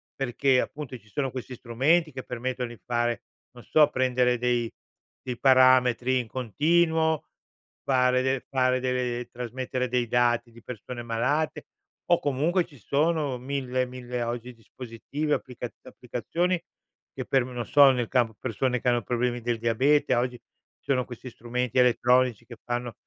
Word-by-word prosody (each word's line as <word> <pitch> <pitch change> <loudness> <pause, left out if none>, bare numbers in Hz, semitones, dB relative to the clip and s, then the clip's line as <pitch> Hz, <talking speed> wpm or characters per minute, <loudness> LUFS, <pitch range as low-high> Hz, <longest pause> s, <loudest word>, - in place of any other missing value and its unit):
Perché, 135 0 +2
appunto, 145 -4 -6
ci 110 - -25
sono 135 +5 -2
questi 130 0 -7
strumenti 150 +8 +1
che 130 0 -7
permettono 125 0 -4
di 120 - -12
fare 120 -1 -1 0.3
non 120 -1 -13
so, 150 -2 +4
prendere 125 -2 +1
dei 120 -1 0 0.6
dei 125 -2 -3
parametri 130 -1 +5
in 120 - -4
continuo, 160 +6 +1 0.6
fare 125 -1 +3
de 130 0 -1
fare 130 -1 +2
delle 125 -1 -2
trasmettere 125 +1 -3
dei 125 -1 0
dati 120 0 +1
di 115 -1 -16
persone 120 +1 -7
malate 130 +7 -1 0.5
o, 175 - +5
comunque, 155 +6 +1
ci 145 - -18
sono 145 +1 0
mille 130 -1 -2
mille 125 -1 -5
oggi, 120 +1 -4
dispositivi, 125 +6 -5
applicat 125 -3 -4
applicazioni 170 +9 -2 0.5
che - - -5
per 135 -2 +2
non 125 -2 -5
so, 140 -2 +7
nel 125 -3 -1
campo 120 -4 +1
persone 125 +1 -1
che - - -3
hanno 120 -1 +1
problemi 120 +1 -1
del 120 0 -1
diabete, 130 +5 +2
oggi 125 0 -1 0.4
ci - - -3
sono 130 -2 +2
questi 125 +1 -9
strumenti 120 +1 -3
elettronici 125 -1 +3
che 120 -1 -11
fanno 120 -1 -3
125 Hz, 150 wpm, -26 LUFS, 120-135 Hz, 0.6 s, so